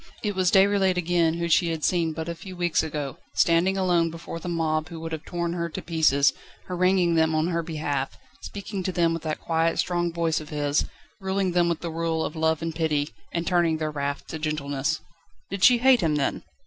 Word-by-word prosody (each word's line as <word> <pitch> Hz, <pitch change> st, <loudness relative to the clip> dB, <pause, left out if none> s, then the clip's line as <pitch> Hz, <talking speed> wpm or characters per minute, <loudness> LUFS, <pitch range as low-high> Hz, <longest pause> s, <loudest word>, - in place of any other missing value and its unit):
It 210 Hz, -2 st, 0 dB
was 185 Hz, -2 st, +2 dB
Déroulède 195 Hz, -1 st, +4 dB
again 170 Hz, -2 st, +2 dB
whom 170 Hz, 0 st, -2 dB
she 170 Hz, +1 st, +4 dB
had 160 Hz, -2 st, -3 dB
seen 170 Hz, -3 st, +2 dB
but 160 Hz, +1 st, -5 dB
a 170 Hz, -, -2 dB
few 185 Hz, +2 st, -10 dB
weeks 175 Hz, -2 st, +1 dB
ago, 150 Hz, -3 st, -4 dB, 0.2 s
standing 175 Hz, +3 st, +3 dB
alone 175 Hz, -3 st, +2 dB
before 165 Hz, 0 st, -7 dB
the 175 Hz, -, -6 dB
mob 160 Hz, -2 st, -1 dB
who 165 Hz, -, -7 dB
would 165 Hz, 0 st, -6 dB
have 160 Hz, -1 st, -4 dB
torn 170 Hz, -1 st, -2 dB
her 170 Hz, -1 st, -2 dB
to -, -, -5 dB
pieces, 155 Hz, -4 st, +3 dB, 0.3 s
haranguing 185 Hz, -1 st, +2 dB
them 160 Hz, -1 st, +3 dB
on 155 Hz, +2 st, +1 dB
her 170 Hz, -1 st, 0 dB
behalf, 150 Hz, -4 st, -3 dB, 0.2 s
speaking 200 Hz, -1 st, -6 dB
to 185 Hz, -, -2 dB
them 170 Hz, -2 st, +2 dB
with 165 Hz, -, -3 dB
that 155 Hz, -1 st, -3 dB
quiet, 165 Hz, 0 st, +1 dB
strong 175 Hz, -1 st, 0 dB
voice 165 Hz, -2 st, 0 dB
of 150 Hz, -, -11 dB
his, 145 Hz, -1 st, 0 dB, 0.3 s
ruling 190 Hz, -1 st, 0 dB
them 175 Hz, -1 st, +2 dB
with 170 Hz, -1 st, -2 dB
the 170 Hz, -, -4 dB
rule 165 Hz, 0 st, -1 dB
of -, -, -5 dB
love 160 Hz, 0 st, +1 dB
and 165 Hz, 0 st, -2 dB
pity, 155 Hz, -2 st, 0 dB, 0.2 s
and 170 Hz, 0 st, -2 dB
turning 170 Hz, -3 st, +2 dB
their 155 Hz, -1 st, -2 dB
wrath 140 Hz, -1 st, -3 dB
to 160 Hz, -, -6 dB
gentleness. 150 Hz, -1 st, -2 dB, 0.5 s
Did 195 Hz, -2 st, -3 dB
she 245 Hz, +4 st, +8 dB
hate 255 Hz, -1 st, +5 dB
him, 160 Hz, -3 st, +1 dB
then? 140 Hz, -2 st, -1 dB
165 Hz, 215 wpm, -25 LUFS, 155-175 Hz, 0.5 s, she